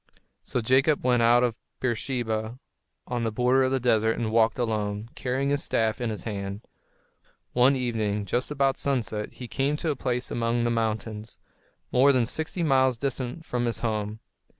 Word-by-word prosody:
So 125 Hz, -, -2 dB
Jacob 135 Hz, +6 st, +3 dB
went 125 Hz, -2 st, +3 dB
out 120 Hz, +1 st, +5 dB
of 120 Hz, -2 st, -1 dB, 0.2 s
Beersheba, 120 Hz, -2 st, -2 dB, 0.5 s
on 120 Hz, -1 st, -2 dB
the 115 Hz, -, 0 dB
border 125 Hz, +4 st, +3 dB
of 130 Hz, 0 st, +2 dB
the 135 Hz, -, +1 dB
desert, 115 Hz, -2 st, +2 dB
and 110 Hz, -2 st, -1 dB
walked 110 Hz, 0 st, +3 dB
alone, 110 Hz, -2 st, -2 dB
carrying 135 Hz, +2 st, -1 dB
his 145 Hz, 0 st, +1 dB
staff 110 Hz, 0 st, 0 dB
in 120 Hz, -, 0 dB
his 110 Hz, -, -4 dB
hand. 100 Hz, -1 st, -4 dB, 0.9 s
One 125 Hz, +3 st, +5 dB
evening, 110 Hz, -5 st, -1 dB
just 120 Hz, +6 st, -1 dB
about 140 Hz, -2 st, +1 dB
sunset, 115 Hz, -6 st, -2 dB
he 125 Hz, -, -8 dB
came 140 Hz, +5 st, 0 dB
to 160 Hz, 0 st, -1 dB
a -, -, -2 dB
place 125 Hz, -1 st, -2 dB
among 120 Hz, 0 st, 0 dB
the 120 Hz, -, +1 dB
mountains, 110 Hz, -1 st, -2 dB, 0.5 s
more 135 Hz, +3 st, +5 dB
than 125 Hz, -3 st, +2 dB
sixty 160 Hz, +7 st, -1 dB
miles 130 Hz, -4 st, +3 dB
distant 135 Hz, +3 st, -3 dB
from 120 Hz, -1 st, -1 dB
his 115 Hz, -, -1 dB
home. 110 Hz, -2 st, -2 dB
120 Hz, 175 wpm, -26 LUFS, 110-130 Hz, 0.9 s, out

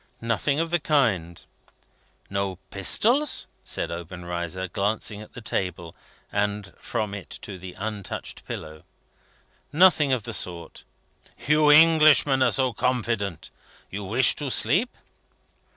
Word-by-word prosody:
"Nothing 115 Hz, +6 st, 0 dB
of 165 Hz, 0 st, -1 dB
the 175 Hz, -, +2 dB
kind." 105 Hz, -, 0 dB, 0.8 s
"No 100 Hz, -1 st, -2 dB, 0.2 s
pistols?" 240 Hz, -, +1 dB, 0.2 s
said 85 Hz, -, -4 dB
Obenreizer, 85 Hz, +1 st, -5 dB
glancing 105 Hz, +3 st, -2 dB
at 105 Hz, -, -13 dB
the 125 Hz, -, -9 dB
table, 90 Hz, -5 st, -3 dB, 0.4 s
and 100 Hz, -1 st, -2 dB
from 105 Hz, -2 st, -3 dB
it 100 Hz, -7 st, -8 dB
to 100 Hz, -3 st, -7 dB
the 90 Hz, 0 st, -9 dB
untouched 105 Hz, -1 st, -6 dB
pillow. 80 Hz, -1 st, -7 dB, 0.9 s
"Nothing 155 Hz, -3 st, +5 dB
of 125 Hz, -4 st, +1 dB
the 115 Hz, +1 st, -6 dB
sort." 85 Hz, -4 st, -4 dB, 0.6 s
"You 150 Hz, +1 st, +4 dB
Englishmen 155 Hz, -3 st, +6 dB
are -, -, +5 dB
so 130 Hz, -2 st, 0 dB
confident! 115 Hz, -, -2 dB, 0.4 s
You 100 Hz, +2 st, -5 dB
wish 120 Hz, +7 st, +4 dB
to 145 Hz, -2 st, -2 dB
sleep?" 185 Hz, -, +3 dB
105 Hz, 120 wpm, -25 LUFS, 95-140 Hz, 0.9 s, Englishmen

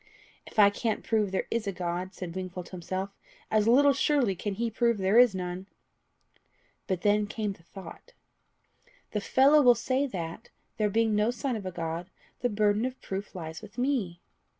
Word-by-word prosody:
"If -, -, -14 dB
I 200 Hz, -1 st, +7 dB
can't 220 Hz, +1 st, -2 dB
prove 215 Hz, -3 st, +1 dB
there 190 Hz, -, -1 dB
is 230 Hz, -2 st, -1 dB
a -, -, 0 dB
God," 180 Hz, 0 st, -4 dB
said 175 Hz, -3 st, -6 dB
Wingfold 185 Hz, -1 st, -5 dB
to -, -, -15 dB
himself, 185 Hz, +2 st, -4 dB, 0.4 s
"as 215 Hz, 0 st, +3 dB
little 280 Hz, +4 st, +6 dB
surely 270 Hz, -6 st, +2 dB
can 200 Hz, +2 st, -3 dB
he 230 Hz, +2 st, -1 dB
prove 235 Hz, 0 st, +2 dB
there 195 Hz, +4 st, +4 dB
is 245 Hz, -5 st, +6 dB
none." 180 Hz, +1 st, -4 dB, 1.2 s
But 185 Hz, -4 st, -1 dB
then 210 Hz, 0 st, +3 dB
came 210 Hz, -1 st, -3 dB
the 180 Hz, -, -20 dB
thought 195 Hz, -, -12 dB, 1.0 s
"The 210 Hz, -, -1 dB
fellow 275 Hz, +8 st, +5 dB
will 245 Hz, -3 st, +7 dB
say 260 Hz, +4 st, 0 dB
that, 175 Hz, -1 st, -6 dB, 0.3 s
there 210 Hz, -1 st, +2 dB
being 225 Hz, +1 st, +2 dB
no 210 Hz, +2 st, +2 dB
sign 250 Hz, +1 st, -2 dB
of 200 Hz, -4 st, -5 dB
a -, -, -3 dB
God, 165 Hz, +1 st, -4 dB, 0.3 s
the 245 Hz, -, 0 dB
burden 210 Hz, 0 st, +2 dB
of 255 Hz, +1 st, -3 dB
proof 195 Hz, +1 st, -6 dB
lies 160 Hz, -1 st, -6 dB
with 215 Hz, +1 st, -13 dB
me." 245 Hz, -10 st, -1 dB
205 Hz, 185 wpm, -28 LUFS, 185-235 Hz, 1.2 s, I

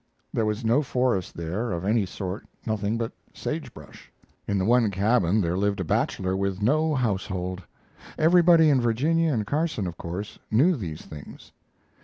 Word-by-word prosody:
There 110 Hz, -, +1 dB
was 105 Hz, +2 st, -2 dB
no 120 Hz, +6 st, +4 dB
forest 125 Hz, -, -1 dB
there 90 Hz, +8 st, -3 dB
of 85 Hz, +1 st, -3 dB
any 105 Hz, -1 st, +2 dB
sort 95 Hz, +2 st, -6 dB, 0.2 s
nothing 110 Hz, 0 st, -1 dB
but 115 Hz, -1 st, -2 dB, 0.2 s
sage -, -, -4 dB
brush. -, -, -14 dB, 0.4 s
In 100 Hz, -, 0 dB
the 95 Hz, -, 0 dB
one 120 Hz, 0 st, +4 dB
cabin 100 Hz, 0 st, +2 dB
there 85 Hz, -1 st, 0 dB
lived 100 Hz, +1 st, 0 dB
a -, -, 0 dB
bachelor 95 Hz, +2 st, 0 dB
with 100 Hz, -1 st, -1 dB
no 150 Hz, +8 st, +2 dB
household. 95 Hz, -6 st, -2 dB, 0.6 s
Everybody 170 Hz, -1 st, +6 dB
in 135 Hz, -3 st, +3 dB
Virginia 155 Hz, +8 st, +2 dB
and 110 Hz, -6 st, -1 dB
Carson, 150 Hz, -, -1 dB
of 85 Hz, -1 st, -5 dB
course, 90 Hz, +5 st, -6 dB
knew 150 Hz, +12 st, +4 dB
these 85 Hz, -, -6 dB
things. 75 Hz, -2 st, -11 dB
110 Hz, 165 wpm, -25 LUFS, 95-125 Hz, 0.6 s, Everybody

